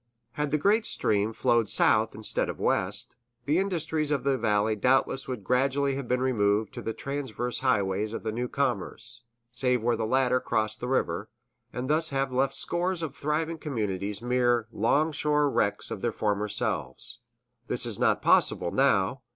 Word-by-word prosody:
Had 150 +3 -2
the 150 - +1
great 210 +8 +2
stream 105 +1 0
flowed 120 -2 +1
south - - +3
instead - - 0
of - - -6
west, - - 0 0.3
the 150 +5 +2
industries 160 -5 -1
of 145 -2 0
the 140 -1 +2
valley 110 -2 +1
doubtless 130 +4 +1
would 125 -6 -5
gradually 135 +4 +1
have 135 -2 -4
been 125 +1 0
removed 105 -4 +1
to - - -6
the 115 - -3
transverse 130 -1 -3
highways 105 -5 0
of 115 - -5
the 110 - -2
new 120 +3 -2
commerce, 120 -2 -3 0.3
save 125 -1 +1
where 120 0 +2
these 110 -1 -2
latter 130 +1 +2
crossed 110 -2 -1
the 125 - -4
river, 105 -5 -1 0.4
and 125 +1 -4
thus 160 +2 +2
have 135 -1 -1
left 135 +1 +1
scores 175 0 -1
of 160 - -3
once - - -20
thriving 155 +2 -1
communities 105 -7 -3
mere 120 -2 +2
'longshore 150 +5 +2
wrecks 100 - -1
of 95 - -5
their 120 - 0
former 105 -1 -1
selves. 105 - -3 0.5
This - - +1
is - - -3
not - - +2
possible, 85 - +3
now. 130 -2 +2
125 Hz, 175 wpm, -27 LUFS, 110-140 Hz, 0.5 s, south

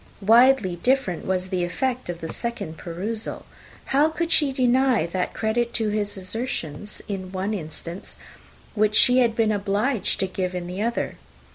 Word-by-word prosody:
Widely 230 -3 +5
different 245 -5 0
was 185 0 -1
the 185 -2 0
effect 250 +6 -2
of 170 -1 -5
a - - -2
second 165 -6 -4
perusal. 200 +6 -5 0.5
How 290 +3 +5
could 335 +1 -2
she 295 -4 +4
deny 255 -5 +3
that 180 +2 -3
credit 235 +2 0
to 220 -2 +2
his 205 -1 -1
assertions, 190 - -4
in 185 -2 -5
one 190 +3 -2
instance, 170 0 -7 0.6
which 215 -1 +2
she 250 +3 +6
had 235 -3 +3
been 225 -2 +2
obliged 205 +3 0
to - - +2
give 185 -1 -3
in 180 -1 -3
the 180 +3 -5
other? 235 +2 -1
210 Hz, 160 wpm, -24 LUFS, 185-240 Hz, 0.6 s, she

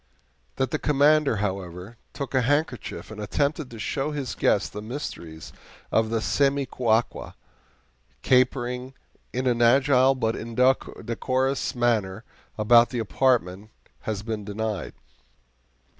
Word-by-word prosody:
That 130 - -1
the 155 - -1
Commander, 150 -1 +3
however, 95 0 -4 0.2
took 140 -1 -6
a 130 - +3
handkerchief 140 -3 -1
and 105 -1 -7
attempted 140 +7 -1
to 115 - -10
show 135 +7 -2
his 140 -6 -4
guest 100 - +1
the 105 - -5
mysteries 85 - -7 0.4
of 110 0 +2
the 115 0 -1
SEMICUACUA, 125 0 0 0.9
capering 125 0 +1 0.4
in 130 +1 -2
an 120 -2 +1
agile 135 +2 +5
but 115 -3 -1
indecorous 130 +2 0
manner 110 -4 0 0.3
about 115 +2 +5
the 125 - -4
apartment, 110 -4 0 0.3
has 105 -2 -4
been 110 -2 -4
denied. 105 0 -4
120 Hz, 115 wpm, -25 LUFS, 110-135 Hz, 0.9 s, agile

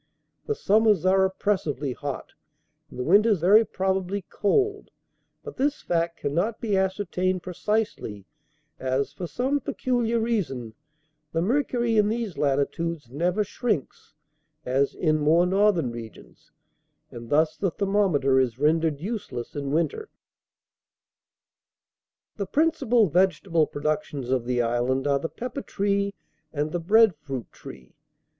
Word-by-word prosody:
The 440 - 0
summers 210 - +3
are 190 +1 +4
oppressively 160 - -1
hot, 140 +1 -6 0.6
and - - -12
the 125 - -2
winters 205 - +4
very 200 +7 +6
probably 190 -1 -2
cold; 405 - 0 0.5
but 455 - -9
this 285 +2 0
fact 170 -1 -1
can 145 - -2
not 210 +8 0
be 215 -4 -1
ascertained 185 -1 0
precisely, 185 - -2 0.5
as, 130 +2 -1
for 175 +4 -5
some 255 - 0
peculiar 240 -3 -1
reason, 145 - -2 0.6
the 165 - +1
mercury 240 0 +1
in 210 0 +3
these 225 -5 -3
latitudes 145 0 -1
never 175 +8 0
shrinks, 205 - -3 0.5
as 135 +2 +1
in 155 -2 +1
more 160 +4 +4
northern 190 - +2
regions, 115 -2 -11 0.6
and 115 -1 -9
thus 155 +1 +2
the 195 - 0
thermometer 180 -9 +2
is 125 -3 0
rendered 155 +1 +1
useless 175 - -5
in 140 -1 -3
winter. 415 - -1 2.3
"The 200 -2 -3
principal 245 - +2
vegetable 175 -1 +2
productions 145 -3 -3
of 130 -3 +1
the 125 -1 +1
island 120 +3 0
are 140 -1 +2
the 165 - -4
pepper 250 +3 -6
tree 200 -2 -1 0.4
and 150 +1 -2
the 175 - -1
bread 215 +4 +5
fruit 135 -6 -7
tree. 65 -2 -12
180 Hz, 130 wpm, -25 LUFS, 145-210 Hz, 2.3 s, very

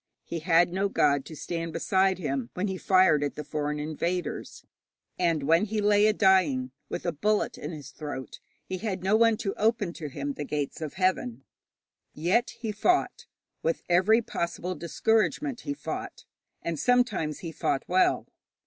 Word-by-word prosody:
He 170 - -4
had 170 +1 +3
no 195 +2 +1
god 145 -6 +2
to 160 - -9
stand 165 +1 -4
beside 190 +3 +2
him 135 -8 -2
when 185 +3 -1
he 190 - -2
fired 185 -6 +4
at 145 - -2
the 150 - -5
foreign 150 0 -2
invaders; 170 +4 -3 0.5
and 165 -5 +1
when 165 +7 +4
he 215 0 -2
lay 205 0 +4
a - - +5
dying, 170 -11 +3 0.2
with - - -4
a 170 - +1
bullet 210 +7 0
in 150 - -6
his 150 -4 -9
throat, 140 -6 -7 0.3
he 185 - -4
had 195 -4 -3
no 195 +3 +3
one 230 0 +4
to 195 - -2
open 215 -4 +1
to 155 -4 -6
him 140 +1 -4
the 150 - -5
gates 145 +1 -3
of 155 -2 -4
heaven. 185 - 0 0.7
Yet 180 +10 +2
he 225 -2 -2
fought 360 - +1 0.3
with 165 - -1
every 200 +7 +4
possible 175 -1 -3
discouragement 225 - 0
he 285 - -3
fought, - - -6 0.4
and 165 -3 -2
sometimes 215 - +1
he 165 - -5
fought 140 - -1
well. 185 +1 +3
175 Hz, 170 wpm, -27 LUFS, 150-205 Hz, 0.7 s, a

